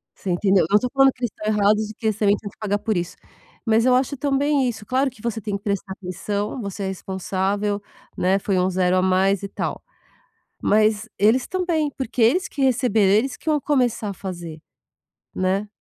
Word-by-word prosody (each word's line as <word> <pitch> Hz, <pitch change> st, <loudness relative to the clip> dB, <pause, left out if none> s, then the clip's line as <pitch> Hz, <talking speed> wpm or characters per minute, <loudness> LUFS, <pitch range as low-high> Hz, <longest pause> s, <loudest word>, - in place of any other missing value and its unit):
Você 195 Hz, -, -6 dB
entendeu? 190 Hz, +1 st, +3 dB
Eu -, -, -4 dB
não 210 Hz, -, +7 dB
tô 250 Hz, -, -2 dB
falando 270 Hz, 0 st, +5 dB
que 255 Hz, -, -14 dB
eles 240 Hz, -, 0 dB
estão 215 Hz, -, -7 dB
errados 210 Hz, +1 st, +2 dB
e -, -, -7 dB
que 220 Hz, -, -11 dB
eles 215 Hz, -2 st, +1 dB
também 205 Hz, -2 st, +3 dB
têm 205 Hz, -, -8 dB
que -, -, -23 dB
pagar 205 Hz, -1 st, 0 dB
por 220 Hz, 0 st, -1 dB
isso. 175 Hz, -1 st, -3 dB, 0.5 s
Mas 225 Hz, 0 st, +3 dB
eu 255 Hz, -1 st, +5 dB
acho 265 Hz, +2 st, 0 dB
também 280 Hz, -1 st, +1 dB
isso 225 Hz, -3 st, -5 dB
claro 265 Hz, +4 st, +1 dB
que 240 Hz, -4 st, -18 dB
você 230 Hz, -1 st, -2 dB
tem 205 Hz, 0 st, -3 dB
que 200 Hz, -, -23 dB
prestar 200 Hz, -2 st, -2 dB
atenção, 200 Hz, +5 st, -4 dB
você 200 Hz, -1 st, -5 dB
é -, -, -1 dB
responsável, 195 Hz, +2 st, -2 dB, 0.4 s
né, 190 Hz, +2 st, +2 dB
foi 195 Hz, -1 st, 0 dB
um 180 Hz, +1 st, +2 dB
0 185 Hz, 0 st, +2 dB
a -, -, +3 dB
mais 190 Hz, +1 st, +2 dB
e 200 Hz, -, -4 dB
tal. -, -, -4 dB, 0.8 s
Mas, 215 Hz, +1 st, +2 dB
eles 225 Hz, +5 st, +4 dB
também, 345 Hz, -5 st, 0 dB
porque 255 Hz, -2 st, -3 dB
eles 255 Hz, +12 st, +3 dB
que 285 Hz, -, -6 dB
receberam, 235 Hz, -6 st, +3 dB
eles 250 Hz, +5 st, +2 dB
que -, -, -4 dB
iam 300 Hz, -1 st, +3 dB
começar 250 Hz, -7 st, 0 dB
a -, -, -4 dB
fazer. 175 Hz, -4 st, -7 dB, 0.8 s
Né. 190 Hz, +3 st, 0 dB
210 Hz, 215 wpm, -22 LUFS, 195-250 Hz, 0.8 s, não